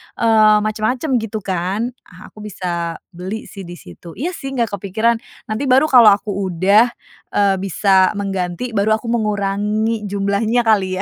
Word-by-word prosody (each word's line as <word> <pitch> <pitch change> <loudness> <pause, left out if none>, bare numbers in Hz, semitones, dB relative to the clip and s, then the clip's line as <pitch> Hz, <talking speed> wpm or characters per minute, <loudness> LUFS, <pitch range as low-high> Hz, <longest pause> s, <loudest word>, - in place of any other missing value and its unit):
eee, 215 -2 +4
macam-macam 220 +7 -2
gitu 220 -2 -5
kan? 190 +6 -2 0.2
Ah, 180 - -14
aku - - -16
bisa 175 -5 -4 0.2
beli 185 +5 -6
sih, 195 -3 -10
disitu. 170 - -12
Iya 335 +7 -3
sih 270 -6 -7
nggak 235 -4 0
kepikiran. 220 +5 0 0.3
Nanti 230 +6 -2
baru 265 +3 +5
kalau 245 -4 +8
aku 205 +1 -6
udah, 195 +4 +3 0.5
eee, 200 -1 +3
bisa 190 0 +2
mengganti, 195 +3 -3
baru 215 0 +2
aku 230 +1 -5
mengurangi 210 0 -1
jumlahnya, 200 +4 0
kali 195 -5 +2
210 Hz, 145 wpm, -18 LUFS, 190-225 Hz, 0.5 s, kalau